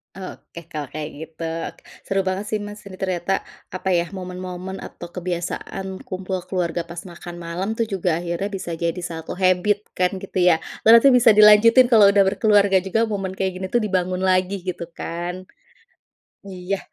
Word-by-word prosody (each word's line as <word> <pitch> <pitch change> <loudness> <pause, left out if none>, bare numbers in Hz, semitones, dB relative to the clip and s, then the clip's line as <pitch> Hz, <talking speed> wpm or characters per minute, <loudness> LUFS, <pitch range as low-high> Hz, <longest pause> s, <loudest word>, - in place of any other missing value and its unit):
Oke, 170 -3 -10
kalau 150 -3 -5
kayak 155 0 -5
gitu, 160 +1 -10 0.6
seru 195 0 -1
banget 190 +2 -1
sih, 215 - 0
Mas, 205 0 -9
ini 190 -2 -11
ternyata, 185 -1 -2 0.4
apa 185 0 -1
ya, 170 +1 0
momen-momen 185 0 -6
atau 175 - -9
kebiasaan 185 +2 -4
kumpul 185 -1 -4
keluarga 175 -2 -1
pas 170 0 -8
makan 175 0 -9
malam 170 +4 -4
tuh 230 - +1
juga 180 -4 -1
akhirnya 175 +4 -3
bisa 185 -4 -4
jadi 170 +1 -2
1 165 -2 -6
habit 190 +3 +2
kan, 180 0 +2
gitu 195 -1 -7
ya. 170 -3 +5 0.2
Berarti 230 +4 +8
bisa 235 -2 +7
dilanjutin 215 +4 +7
kalau 210 -5 +7
udah 200 -1 +4
berkeluarga 200 -2 +3
juga, 225 +4 +1
momen 195 -3 -3
kayak 190 0 -2
gini 190 0 -4
tuh 240 - +3
dibangun 185 -3 -1
lagi, 185 +1 +1
gitu 180 -1 -3
kan. 175 +3 -5 1.0
Iya. 190 0 -4
185 Hz, 165 wpm, -22 LUFS, 175-200 Hz, 1.0 s, Berarti